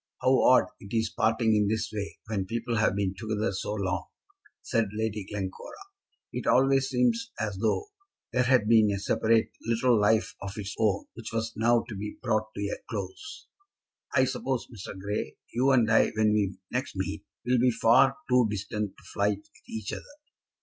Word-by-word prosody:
"How 130 Hz, 0 st, +4 dB
odd 130 Hz, -, +6 dB
it 100 Hz, +3 st, -7 dB
is 110 Hz, -1 st, 0 dB
parting 110 Hz, 0 st, +2 dB
in 105 Hz, -1 st, +3 dB
this 110 Hz, 0 st, -1 dB
way, 100 Hz, -2 st, -4 dB
when 100 Hz, -3 st, -2 dB
people 115 Hz, +1 st, -2 dB
have 110 Hz, -3 st, +2 dB
been 100 Hz, -2 st, 0 dB
together 110 Hz, +1 st, -2 dB
so 100 Hz, +2 st, -3 dB
long," 95 Hz, -3 st, -2 dB, 0.6 s
said 115 Hz, -2 st, +1 dB
Lady 110 Hz, -1 st, -2 dB
Glencora. 95 Hz, -2 st, -6 dB, 0.6 s
"It -, -, -4 dB
always 135 Hz, +1 st, +4 dB
seems 230 Hz, -, +1 dB
as 105 Hz, -3 st, -2 dB
though 115 Hz, -, 0 dB, 0.4 s
there 125 Hz, -, +3 dB
had 125 Hz, -4 st, +4 dB
been 110 Hz, -2 st, +6 dB
a 100 Hz, -, 0 dB
separate 110 Hz, +3 st, +2 dB
little 115 Hz, +2 st, +2 dB
life 110 Hz, +2 st, +2 dB
of 100 Hz, +1 st, -6 dB
its 100 Hz, -1 st, -4 dB
own 105 Hz, -3 st, +1 dB
which 115 Hz, -1 st, -8 dB
was 115 Hz, 0 st, -2 dB
now 115 Hz, +1 st, +3 dB
to 115 Hz, -, -6 dB
be 105 Hz, +2 st, -6 dB
brought 110 Hz, -3 st, 0 dB
to -, -, -4 dB
a 100 Hz, -, -3 dB
close. 110 Hz, -, -6 dB, 0.7 s
I 130 Hz, -1 st, +5 dB
suppose, 130 Hz, -1 st, -2 dB
Mr. 95 Hz, -2 st, -8 dB
Grey, 105 Hz, +2 st, -3 dB, 0.2 s
you 130 Hz, +3 st, +2 dB
and 125 Hz, -4 st, +4 dB
I, 110 Hz, -, +5 dB
when 110 Hz, -1 st, +3 dB
we 100 Hz, -3 st, 0 dB
next -, -, -2 dB
meet, -, -, -3 dB, 0.2 s
will 125 Hz, 0 st, +3 dB
be 125 Hz, +1 st, +4 dB
far 125 Hz, +3 st, +4 dB
too 125 Hz, -2 st, +4 dB
distant 105 Hz, 0 st, -3 dB
to -, -, -18 dB
fight 100 Hz, 0 st, +1 dB
with 100 Hz, -, -23 dB
each 110 Hz, -1 st, -4 dB
other." -, -, -4 dB
110 Hz, 185 wpm, -28 LUFS, 105-120 Hz, 0.7 s, odd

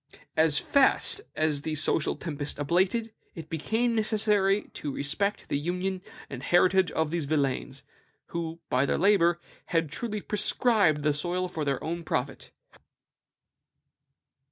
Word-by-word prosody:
As 155 Hz, -2 st, +3 dB
fast 280 Hz, +8 st, +3 dB
as 155 Hz, -2 st, 0 dB
the 155 Hz, +1 st, -3 dB
social 150 Hz, +1 st, 0 dB
tempest 145 Hz, -3 st, -4 dB
abated, 185 Hz, +9 st, 0 dB, 0.2 s
it 160 Hz, -2 st, -9 dB
became 220 Hz, +10 st, 0 dB
necessary 210 Hz, -2 st, +2 dB
to 145 Hz, -, -5 dB
respect 160 Hz, +10 st, -2 dB
the 140 Hz, -, -1 dB
union 180 Hz, +4 st, -2 dB, 0.3 s
and 130 Hz, -2 st, -7 dB
heritage 185 Hz, +3 st, +3 dB
of 160 Hz, -1 st, 0 dB
these 170 Hz, -3 st, -1 dB
villeins, 140 Hz, -3 st, -1 dB, 0.5 s
who 165 Hz, -1 st, -4 dB
by 130 Hz, +2 st, +1 dB
their -, -, +1 dB
labor 175 Hz, -3 st, +3 dB, 0.3 s
had 165 Hz, -3 st, 0 dB
truly 215 Hz, +5 st, -3 dB
prescribed 205 Hz, -, +2 dB
the 150 Hz, 0 st, +2 dB
soil 175 Hz, +5 st, -1 dB
for 160 Hz, -3 st, -4 dB
their 140 Hz, -2 st, -1 dB
own 170 Hz, +1 st, -3 dB
profit." 135 Hz, -3 st, -3 dB
170 Hz, 130 wpm, -27 LUFS, 150-200 Hz, 0.5 s, As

